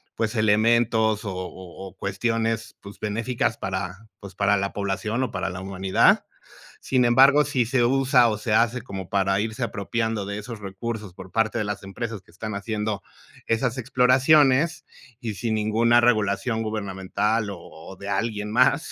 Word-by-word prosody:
pues, 115 +1 -2
elementos, 110 0 +2
o 100 - -3
o 95 0 -8
o 95 - -21
cuestiones, 115 +3 -2
pues, 100 0 -12
benéficas 115 +2 -1
para, 95 +2 -5
pues, 100 -2 -11
para 100 0 +2
la 100 0 -2
población 100 +5 -2
o 125 - -3
para 95 0 -2
la 90 +1 -6
humanidad. 95 0 +2 0.6
Sin 130 -2 +1
embargo, 135 +5 +6
si 130 -4 0
se 125 -1 +2
usa, 130 -1 +4
o 110 - -1
se 105 +1 -3
hace 120 +2 +2
como 95 -5 -7
para 95 0 +1
irse 110 +4 -4
apropiando 110 -1 -2
de 100 +1 -4
esos 115 +1 -7
recursos 105 0 -6
por 95 0 -11
parte 110 +2 0
de - - 0
las 105 -1 -4
empresas 110 +1 -5
que - - -24
están 105 +2 -5
haciendo 105 0 -3 0.5
esas 115 +2 0
exploraciones 135 +5 +3 0.4
y 110 -3 -4
sin 115 +1 -2
ninguna 115 +3 +3
regulación 110 0 +1
gubernamental, 105 +1 -1
o 100 - -7
o 85 +3 -12
de 100 +1 -8
alguien 105 0 -2
más, 125 +7 +3
110 Hz, 165 wpm, -24 LUFS, 100-120 Hz, 0.6 s, embargo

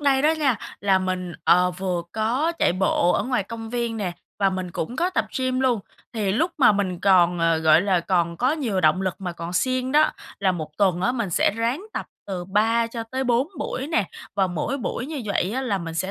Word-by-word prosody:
đây 275 -2 +3
đó 305 - +5
nha, 270 -7 +2 0.2
là 195 -1 +3
mình, 185 -1 -3
ờ, 180 +1 +5
vừa 180 -1 -2
có 245 +10 0
chạy - - +3
bộ 180 -1 +2
ở - - +1
ngoài 250 -5 0
công 225 +2 -8
viên 235 -2 -2
nè, 190 -5 -2 0.3
và 195 -1 +3
mình 185 -1 -4
cũng 170 +9 -4
có 350 +3 +1
tập - - 0
gym 255 0 0
luôn. 250 -5 +2 0.3
Thì 210 -4 -1
lúc 325 - +1
mà 240 -6 +6
mình 190 -4 -1
còn, 180 -3 +4
ờ, 165 -1 +2
gọi 160 -1 +5
là, 190 -3 +2
còn 170 -1 0
có 255 - +2
nhiều 240 -12 -1
động 155 +3 +3
lực 185 -2 -1
mà 180 -2 -4
còn 170 0 -6
siêng 255 +7 0
đó, 305 +1 +5 0.3
là 190 -2 +3
một 155 -3 -5
tuần 185 -4 +2
á 245 - +2
mình 235 -7 -2
sẽ - - +3
ráng 235 +9 -1
tập - - -4 0.2
từ 185 -3 -4
3 220 +5 +2
cho 230 0 -5
tới 260 +4 -3
4 245 +4 +2
buổi 270 -1 -3
nè, 315 - 0 0.3
và 195 - +3
mỗi 180 - -2
buổi 250 0 -3
như 300 -3 -5
vậy 200 -1 0
á 260 - -1
là 205 -6 0
mình 165 -2 -6
sẽ 185 +3 -2
205 Hz, 235 wpm, -23 LUFS, 180-255 Hz, 0.3 s, mà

